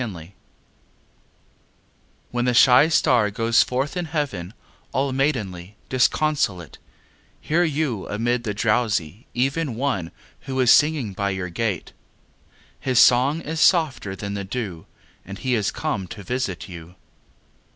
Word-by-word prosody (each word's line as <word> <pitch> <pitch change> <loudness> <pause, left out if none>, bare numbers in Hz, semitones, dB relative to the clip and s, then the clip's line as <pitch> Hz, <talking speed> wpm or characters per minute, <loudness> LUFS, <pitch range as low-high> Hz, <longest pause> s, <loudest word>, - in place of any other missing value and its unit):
IV 90 -8 -6 2.0
When 120 0 -1
the 125 -1 +1
shy 125 +5 +7
star 125 -8 +3
goes 115 +2 +2
forth 135 +6 -1
in 180 -1 -2
heaven 135 - -4 0.4
All 135 +1 0
maidenly, 105 -9 -2
disconsolate, 130 - 0 0.6
Hear 170 +3 +1
you 145 - -1
amid 120 +3 -1
the 105 -3 -3
drowsy 105 -3 0
even 135 +1 -1
One 115 -10 -2 0.4
who 130 0 -2
is 125 -2 +5
singing 145 -9 +2
by 100 +1 -1
your 95 -2 -3
gate. 100 0 -3 0.9
His 130 -2 -1
song 130 +7 +5
is 160 +1 -4
softer 150 - +2
than 100 +1 -5
the 100 -1 -4
dew 95 -5 -5 0.4
And 100 +2 -9
he 130 +2 -2
is 110 -4 +1
come 95 - -3
to 100 +2 -9
visit 125 -6 -3
you. 85 -1 -11
120 Hz, 130 wpm, -23 LUFS, 100-135 Hz, 2.0 s, shy